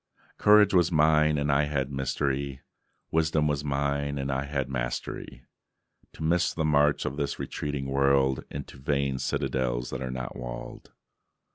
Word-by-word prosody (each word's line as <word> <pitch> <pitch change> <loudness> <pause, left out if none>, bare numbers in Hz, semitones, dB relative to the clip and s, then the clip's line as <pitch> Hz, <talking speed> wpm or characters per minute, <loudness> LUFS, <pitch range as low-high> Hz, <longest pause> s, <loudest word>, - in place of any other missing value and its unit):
Courage 105 -1 +6
was 90 -1 +4
mine, 75 -1 +4
and 70 0 +1
I 70 +2 +3
had 70 -2 -2
mystery; 65 0 -2 0.5
Wisdom 80 -1 +2
was 75 -1 -1
mine, 70 0 -1
and 70 0 -2
I 65 +1 -1
had 70 -2 -2
mastery - - -4 0.7
To - - -8
miss 85 +3 +1
the 80 - 0
march 75 -1 +3
of 70 - -3
this 70 -2 -2
retreating 75 -2 -4
world 70 -1 +2
Into 70 -1 -7
vain 70 -1 -1
citadels 60 -1 -1
that 65 - -4
are 65 - -3
not 65 -1 -5
walled. 60 0 -8
70 Hz, 150 wpm, -27 LUFS, 65-75 Hz, 0.7 s, Courage